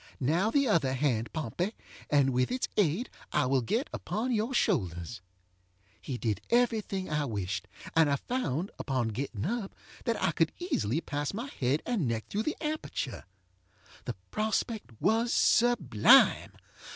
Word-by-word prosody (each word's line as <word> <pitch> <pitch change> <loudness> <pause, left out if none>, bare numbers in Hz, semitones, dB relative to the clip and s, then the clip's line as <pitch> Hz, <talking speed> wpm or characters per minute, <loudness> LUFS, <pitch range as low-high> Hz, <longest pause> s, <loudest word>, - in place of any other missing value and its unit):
Now, 165 - +2
the 280 +2 +2
other 160 - +2
hand, 125 -4 0
Pompey, 165 - -3 0.3
and 140 -2 +4
with 125 0 +1
its 255 0 -1
aid 200 - +2 0.2
I 150 - +2
will 130 0 +2
get 230 - -1
upon 220 +7 -2
your 225 +2 0
shoulders. 100 - 0
ŌĆØ 90 +1 -39
He 130 - -4
did 110 -4 -1
every 235 -2 +3
thing 190 -2 -4
I 150 -1 0
wished, 100 -4 -3 0.3
and 160 -2 +5
I 140 - +3
found, 180 - -2
upon 130 -5 -1
getting 115 -1 -4
up, 215 0 -3 0.3
that - - 0
I - - +2
could - - +1
easily 160 - -1
pass 145 +3 -3
my 230 +4 -3
head 135 +4 +1
and 215 - 0
neck 115 -1 -2
through 210 - -1
the - - -5
aperture. 305 - -3 0.8
The - - -3 0.2
prospect 220 - -1
was 230 +2 +2
sublime. 175 - +5
150 Hz, 155 wpm, -30 LUFS, -, 0.8 s, and